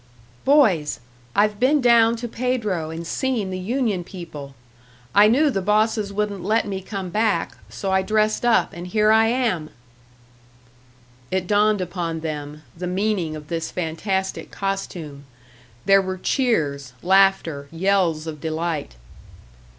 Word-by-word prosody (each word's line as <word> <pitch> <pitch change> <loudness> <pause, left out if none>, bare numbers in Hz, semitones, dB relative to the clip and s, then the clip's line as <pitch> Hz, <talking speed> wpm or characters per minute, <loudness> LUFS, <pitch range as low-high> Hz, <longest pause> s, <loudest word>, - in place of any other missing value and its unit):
"Boys! 220 - +3 0.4
I've 210 0 +2
been 280 +4 +4
down 235 -2 +5
to 235 +1 -5
Pedro 225 -9 -2
and 165 +1 -6
seen 225 0 -1
the 185 - -4
union 215 -2 -1
people. 155 -7 -9 0.6
I 205 +1 +7
knew 280 +7 +3
the 195 - -1
bosses 210 +1 +1
wouldn't 200 -2 -2
let 215 +4 +1
me 190 -1 -4
come 190 -2 -6
back, 215 +1 0
so 195 - -4
I 190 0 +3
dressed 215 +3 +1
up, 230 -7 +3
and 175 +1 -7
here 215 +3 +3
I 220 0 +5
am!" 225 -11 0 1.6
It 185 -1 -1
dawned 210 +1 +2
upon 170 -2 -3
them, 150 -1 -6
the 180 +2 -5
meaning 185 -4 -1
of 150 -1 -9
this 165 0 -3
fantastic 190 +3 -3
costume; 175 -7 -5 0.6
there 195 0 +6
were 185 0 -4
cheers, 150 - 0
laughter, 190 -6 +3
yells 170 -2 +1
of 155 -3 -7
delight. 160 - -3
190 Hz, 135 wpm, -22 LUFS, 165-215 Hz, 1.6 s, I